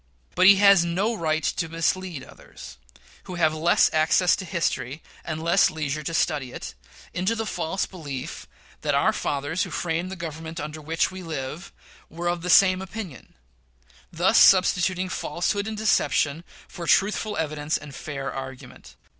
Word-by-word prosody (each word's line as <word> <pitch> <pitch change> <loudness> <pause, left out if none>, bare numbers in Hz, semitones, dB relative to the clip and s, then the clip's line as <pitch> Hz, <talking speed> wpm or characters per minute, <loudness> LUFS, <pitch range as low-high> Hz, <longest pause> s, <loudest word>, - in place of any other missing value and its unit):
But 185 +1 +5
he 200 - +9
has 200 -2 +6
no 190 +7 0
right 160 -6 -1
to 165 +1 -1
mislead 165 -1 -2
others 60 +1 -13 0.5
who 180 - -7
have 160 -3 +2
less 165 +2 +3
access 160 +3 +3
to 190 - -6
history, 160 -5 -2 0.2
and 160 -1 -5
less 175 +4 +4
leisure 155 -1 -3
to 160 +2 -4
study 145 -8 0
it, - - -7 0.4
into 185 +6 0
the 225 0 -3
false 180 -2 -2
belief 145 -8 -7 0.3
that - - 0
"our - - +3
fathers 145 +5 -2
who - - -1
framed 170 +1 -2
the 190 - -6
Government 165 -1 -7
under 150 +1 -6
which 160 +4 0
we 185 0 -8
live" 155 +1 -6 0.4
were 175 +2 -3
of 175 -1 -2
the 180 - -4
same 185 0 +6
opinion 190 - -8 0.8
thus - - +3
substituting 185 -1 +4
falsehood 200 +3 -2
and 220 -1 -5
deception 165 -7 +1 0.2
for 170 -1 -8
truthful 210 +1 +2
evidence 155 -1 -1
and 150 -2 -11
fair 135 -1 -5
argument. 130 -1 -9
170 Hz, 160 wpm, -24 LUFS, 155-185 Hz, 0.8 s, he